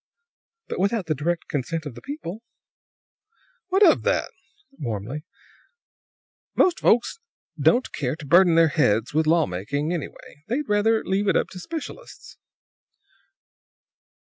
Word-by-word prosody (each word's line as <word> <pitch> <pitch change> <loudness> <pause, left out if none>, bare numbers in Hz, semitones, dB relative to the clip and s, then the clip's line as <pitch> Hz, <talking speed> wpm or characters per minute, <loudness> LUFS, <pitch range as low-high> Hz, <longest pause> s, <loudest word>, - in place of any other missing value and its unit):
"But - - -5
without 200 +1 0
the 160 - 0
direct 165 +4 -2
consent 155 +3 -3
of 145 - -6
the - - -12
people." 270 - -7 1.3
"What 390 +2 +4
of - - +5
that?" - - 0 0.5
warmly. 120 +5 -5 1.3
"Most 365 -2 +3
folks 240 - +2 0.4
don't 250 +2 +2
care 135 -1 -2
to 155 -2 -10
burden 175 +3 +5
their 165 -1 +5
heads 115 -7 +1
with 155 +1 +1
law 165 0 +4
making, 140 - -3
anyhow. 170 -5 -4 0.3
They'd 270 +6 -2
rather 215 +2 +2
leave 195 +2 0
it - - +3
up - - -1
to 185 - -9
specialists." 330 - -9
170 Hz, 130 wpm, -24 LUFS, 145-220 Hz, 1.3 s, of